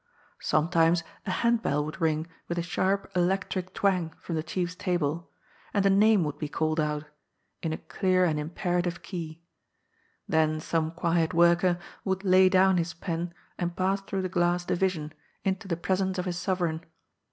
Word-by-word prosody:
Sometimes 165 Hz, +2 st, +2 dB, 0.2 s
a -, -, -1 dB
handbell 220 Hz, -8 st, +1 dB
would 155 Hz, +4 st, -7 dB
ring 160 Hz, -1 st, +1 dB, 0.2 s
with 170 Hz, -, -3 dB
a 170 Hz, -, 0 dB
sharp, 195 Hz, +3 st, 0 dB
electric 185 Hz, 0 st, 0 dB
twang 185 Hz, -5 st, +1 dB
from 170 Hz, -, -6 dB
the 160 Hz, -, 0 dB
chiefs 175 Hz, +3 st, -2 dB
table, 170 Hz, -3 st, -1 dB, 0.5 s
and 200 Hz, -1 st, +3 dB
a 195 Hz, -, +5 dB
name 205 Hz, -1 st, +5 dB
would 150 Hz, -2 st, -4 dB
be 150 Hz, -, -2 dB
called 155 Hz, +1 st, 0 dB
out 150 Hz, -1 st, 0 dB, 0.3 s
— -, -, -48 dB
in 165 Hz, -, -2 dB
a 160 Hz, -, -2 dB
clear 185 Hz, -2 st, +1 dB
and 155 Hz, -3 st, +1 dB
im 150 Hz, +1 st, -4 dB
perative 175 Hz, 0 st, -1 dB
key. 165 Hz, -3 st, -6 dB, 0.8 s
Then 155 Hz, -1 st, +2 dB
some 160 Hz, 0 st, 0 dB
quiet 165 Hz, -1 st, 0 dB
worker 175 Hz, +1 st, +4 dB, 0.3 s
would 190 Hz, 0 st, -1 dB
lay 185 Hz, -1 st, +6 dB
down 190 Hz, 0 st, +4 dB
his 170 Hz, 0 st, -1 dB
pen 170 Hz, -1 st, -3 dB, 0.3 s
and 175 Hz, -1 st, -2 dB
pass 195 Hz, +1 st, +1 dB
through 195 Hz, -1 st, -3 dB
the -, -, 0 dB
glass 175 Hz, -1 st, +1 dB
division, 175 Hz, -5 st, -1 dB, 0.3 s
into 195 Hz, +2 st, -1 dB
the 170 Hz, -3 st, -1 dB
presence 190 Hz, +2 st, 0 dB
of 180 Hz, -, -2 dB
his 175 Hz, -1 st, -2 dB
sovereign. 175 Hz, -3 st, -1 dB
175 Hz, 175 wpm, -28 LUFS, 160-190 Hz, 0.8 s, lay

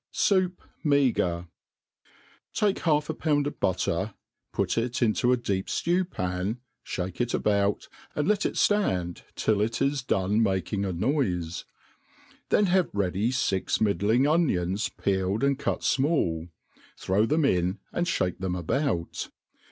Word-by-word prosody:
Sffup' 190 Hz, -4 st, +1 dB, 0.2 s
Meagre, 125 Hz, -, +2 dB, 1.1 s
TAKE 205 Hz, -2 st, +1 dB
half 150 Hz, -3 st, +1 dB
a 160 Hz, -, -2 dB
pound 150 Hz, -2 st, +1 dB
of 145 Hz, -, -5 dB
butter, 95 Hz, +2 st, 0 dB, 0.4 s
pur -, -, +1 dB
it 120 Hz, +2 st, -1 dB
into 120 Hz, +2 st, +2 dB
a 125 Hz, -, +4 dB
deep 100 Hz, -5 st, -2 dB
ftew 175 Hz, +2 st, 0 dB
pan, 90 Hz, -, -2 dB, 0.2 s
fbake 90 Hz, +4 st, -4 dB
it 120 Hz, 0 st, 0 dB
about, 100 Hz, -1 st, +1 dB, 0.3 s
and 150 Hz, -, 0 dB
let 210 Hz, -1 st, +2 dB
it -, -, -1 dB
itand 90 Hz, -, +1 dB
till 105 Hz, -2 st, +1 dB
it 115 Hz, +2 st, 0 dB
has 140 Hz, +3 st, +1 dB
done 105 Hz, -2 st, +1 dB
making 100 Hz, 0 st, 0 dB
a 95 Hz, -, -1 dB
noiiej 90 Hz, -, -1 dB, 0.8 s
then 210 Hz, -, +4 dB
haye 185 Hz, -1 st, +2 dB
ready 100 Hz, +2 st, 0 dB
fix 125 Hz, -7 st, 0 dB
middling 110 Hz, +5 st, +2 dB
onions 105 Hz, -, +1 dB
peeled 95 Hz, +3 st, -1 dB
and 140 Hz, 0 st, +2 dB
cut -, -, -1 dB
imali, 130 Hz, -, +1 dB, 0.5 s
throw 100 Hz, +4 st, +1 dB
them 155 Hz, +4 st, +2 dB
iUt 90 Hz, -6 st, +1 dB, 0.2 s
and 175 Hz, +1 st, 0 dB
(bake 90 Hz, -1 st, -1 dB
them 95 Hz, -1 st, -2 dB
about. 90 Hz, -, -2 dB
110 Hz, 140 wpm, -27 LUFS, 95-145 Hz, 1.1 s, a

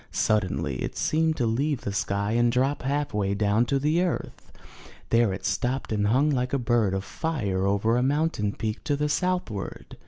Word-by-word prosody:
Suddenly 90 Hz, -, 0 dB
it -, -, -4 dB
seemed 160 Hz, 0 st, +1 dB
to 120 Hz, -, +1 dB
leave 135 Hz, +5 st, 0 dB
the 100 Hz, -, -4 dB
sky 100 Hz, +1 st, -1 dB
and 120 Hz, +1 st, +3 dB
drop 130 Hz, +4 st, +1 dB
half 140 Hz, +1 st, -1 dB
way 100 Hz, -1 st, 0 dB
down 105 Hz, +3 st, +2 dB
to 140 Hz, -, +1 dB
the 155 Hz, +5 st, +1 dB
earth. 180 Hz, -2 st, -3 dB, 0.6 s
There 115 Hz, -3 st, +4 dB
it 95 Hz, -, -5 dB
stopped 130 Hz, +1 st, -1 dB
and 105 Hz, -1 st, +1 dB
hung 135 Hz, +7 st, +3 dB
like 125 Hz, -1 st, -1 dB
a -, -, +3 dB
bird 115 Hz, -6 st, +1 dB
of 95 Hz, -, -2 dB
fire 100 Hz, -, -2 dB
over 100 Hz, +4 st, +2 dB
a -, -, +2 dB
mountain 135 Hz, -7 st, 0 dB
peak 110 Hz, 0 st, -4 dB
to 145 Hz, -, +1 dB
the 150 Hz, +1 st, -1 dB
southward. 150 Hz, -, -2 dB
120 Hz, 190 wpm, -26 LUFS, 105-145 Hz, 0.6 s, There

